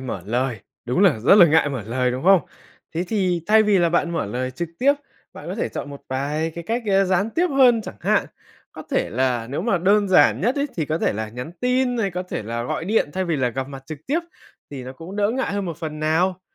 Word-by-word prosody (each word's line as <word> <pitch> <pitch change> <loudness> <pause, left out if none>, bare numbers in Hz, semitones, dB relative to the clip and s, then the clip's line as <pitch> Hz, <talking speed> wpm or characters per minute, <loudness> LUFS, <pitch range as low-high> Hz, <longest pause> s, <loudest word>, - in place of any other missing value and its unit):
mở 120 -8 -5
lời, 120 0 -1 0.2
đúng 125 +9 0
là 175 - +4
rất 120 - +5
là 195 -4 +8
ngại 155 -1 +3
mở 130 -6 -4
lời, 125 +2 0
đúng 130 +4 -4
không? 190 -1 +6 0.5
Thế 170 +2 -1
thì 185 -6 0
thay 220 +1 +6
vì 210 -2 +3
là 170 -1 +3
bạn 170 0 +1
mở 165 -7 -2
lời 125 +5 -3
trực 170 +6 -5
tiếp, 275 +3 +4 0.4
bạn - - -11
có - - -3
thể - - -2
chọn 145 - -6
một 140 - -10
vài 145 +5 -2
cái 170 - -7
cách, 235 +2 -1
ơ, 195 -1 +3
gián 190 +4 +1
tiếp 350 +7 +1
hơn 255 -4 +5
chẳng 105 - -9
hạn, - - +1 0.5
có - - -9
thể - - 0
là 125 -1 0
nếu 145 +5 -2
mà 205 -3 +1
đơn 200 +3 +3
giản 185 - +5
nhất 240 +8 +1
ấy, 285 0 0
thì 160 - 0
có 155 +2 -1
thể - - +1
là 110 +1 -4
nhắn 125 +8 -7
tin 250 0 +1
hay 200 -4 0
có 180 +1 -3
thể 180 - -5
là 115 +2 -4
gọi 125 +6 -3
điện 200 -6 +1
thay 190 +3 -1
vì 170 -3 -1
là 130 -3 +1
gặp 130 +2 -4
mặt 135 -1 -9
trực 155 +1 -7
tiếp 310 +5 +1 0.5
thì 135 -3 -7
nó 130 - -7
cũng 165 +8 -10
đỡ 205 0 +2
ngại 260 -2 -2
hơn 200 -1 -2
một 170 -4 -5
phần 155 -1 -6
nào. 175 +4 +1
170 Hz, 260 wpm, -22 LUFS, 130-200 Hz, 0.5 s, là